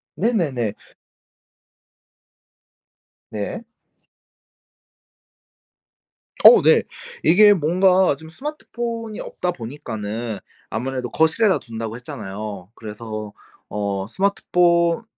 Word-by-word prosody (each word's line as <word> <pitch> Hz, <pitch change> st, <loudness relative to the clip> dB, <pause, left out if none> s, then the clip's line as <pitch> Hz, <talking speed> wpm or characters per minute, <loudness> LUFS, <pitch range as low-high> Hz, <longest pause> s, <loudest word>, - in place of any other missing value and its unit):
네네네. 150 Hz, -, 0 dB, 2.6 s
네. 110 Hz, -, -5 dB, 2.8 s
어 485 Hz, -, +10 dB
네. -, -, +5 dB, 0.4 s
이게 205 Hz, +4 st, +7 dB
뭔가 185 Hz, 0 st, +3 dB
좀 160 Hz, +3 st, -13 dB
스마트폰이 235 Hz, -, -5 dB
없다 180 Hz, -, -3 dB
보니까는 115 Hz, -, -5 dB, 0.3 s
아무래도 125 Hz, +2 st, -3 dB
거실에다 160 Hz, -, +2 dB
둔다고 115 Hz, -1 st, -6 dB
했잖아요. 100 Hz, -5 st, -7 dB
그래서 110 Hz, -1 st, -7 dB, 0.4 s
어 100 Hz, -2 st, -2 dB
스마트폰 175 Hz, -, +2 dB
140 Hz, 180 characters per minute, -21 LUFS, -, 2.8 s, 어